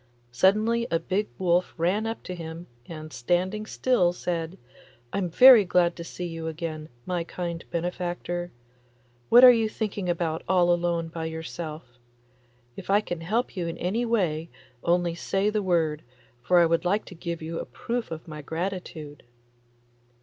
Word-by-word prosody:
Suddenly 215 Hz, -, +2 dB
a 165 Hz, -, +2 dB
big 190 Hz, +5 st, -1 dB
wolf 180 Hz, -1 st, +1 dB
ran 190 Hz, +7 st, +1 dB
up 225 Hz, -, -5 dB
to 185 Hz, -, -6 dB
him, 165 Hz, 0 st, -7 dB, 0.2 s
and 155 Hz, -2 st, -8 dB
standing 180 Hz, -, -1 dB
still 190 Hz, -11 st, +2 dB
said, 170 Hz, 0 st, -3 dB, 0.6 s
'I'm 195 Hz, -3 st, -1 dB
very 245 Hz, +5 st, +9 dB
glad 175 Hz, -1 st, +2 dB
to 170 Hz, -, -6 dB
see 180 Hz, +1 st, -6 dB
you 165 Hz, -1 st, -5 dB
again, 160 Hz, -1 st, -5 dB, 0.2 s
my 180 Hz, -2 st, -1 dB
kind 170 Hz, -1 st, -5 dB
benefactor. 175 Hz, 0 st, -3 dB, 0.8 s
What 245 Hz, +2 st, +8 dB
are 255 Hz, -, +12 dB
you 225 Hz, -2 st, +2 dB
thinking 205 Hz, -4 st, -3 dB
about 165 Hz, -2 st, -1 dB
all 175 Hz, -2 st, +4 dB
alone 170 Hz, -1 st, -1 dB
by 165 Hz, 0 st, -5 dB
yourself? 155 Hz, -4 st, -7 dB, 0.8 s
If 195 Hz, -, -10 dB
I 200 Hz, +1 st, +5 dB
can 175 Hz, -5 st, -5 dB
help 220 Hz, +9 st, -1 dB
you 175 Hz, -3 st, -2 dB
in 165 Hz, -, -4 dB
any 200 Hz, +7 st, -1 dB
way 175 Hz, -9 st, 0 dB, 0.3 s
only 175 Hz, 0 st, +2 dB
say 195 Hz, +4 st, 0 dB
the 210 Hz, 0 st, 0 dB
word, 165 Hz, -5 st, +1 dB, 0.4 s
for 180 Hz, +9 st, +3 dB
I 170 Hz, -, +7 dB
would 165 Hz, +1 st, +1 dB
like 200 Hz, +4 st, +1 dB
to -, -, -11 dB
give 170 Hz, -1 st, -5 dB
you 165 Hz, +1 st, -4 dB
a -, -, -4 dB
proof 235 Hz, 0 st, -4 dB
of 160 Hz, 0 st, -7 dB
my 150 Hz, -1 st, -7 dB
gratitude. 160 Hz, -2 st, -5 dB
175 Hz, 165 wpm, -26 LUFS, 165-195 Hz, 0.8 s, are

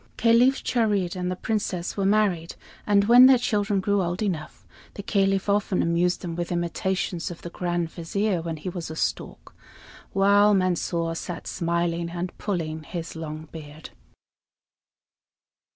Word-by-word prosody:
Caliph 240 Hz, +4 st, +4 dB
Charid 205 Hz, -7 st, 0 dB
and 180 Hz, 0 st, -2 dB
the 185 Hz, -, -2 dB
Princess 185 Hz, -4 st, -2 dB
were 195 Hz, -1 st, 0 dB
married; 195 Hz, -5 st, +1 dB, 0.3 s
and 200 Hz, -1 st, +4 dB
when 245 Hz, +4 st, +8 dB
their 265 Hz, -1 st, +7 dB
children 210 Hz, -4 st, 0 dB
grew 200 Hz, +1 st, +1 dB
old 175 Hz, +3 st, -2 dB
enough, 165 Hz, -7 st, -4 dB, 0.3 s
the 200 Hz, -, -6 dB
Caliph 195 Hz, -1 st, +1 dB
often 200 Hz, -2 st, +1 dB
amused 175 Hz, +2 st, +1 dB
them 170 Hz, -3 st, -5 dB
with 175 Hz, 0 st, -4 dB
imitations 175 Hz, 0 st, -2 dB
of 175 Hz, -, -10 dB
the 170 Hz, -, -7 dB
Grand 175 Hz, -2 st, -2 dB
Vizier 185 Hz, +2 st, -1 dB
when 165 Hz, -1 st, -4 dB
he 155 Hz, -, -8 dB
was 175 Hz, -3 st, -5 dB
a 160 Hz, -, -6 dB
stork, -, -, -4 dB, 0.6 s
while 200 Hz, +1 st, +4 dB
Mansor 175 Hz, -2 st, 0 dB
sat 170 Hz, +1 st, -6 dB
smiling 170 Hz, 0 st, -1 dB
and 175 Hz, +1 st, -5 dB
pulling 160 Hz, -6 st, -3 dB
his 165 Hz, +2 st, -7 dB
long 155 Hz, -1 st, -6 dB
beard. 155 Hz, -1 st, -10 dB
180 Hz, 150 wpm, -25 LUFS, 170-200 Hz, 0.6 s, when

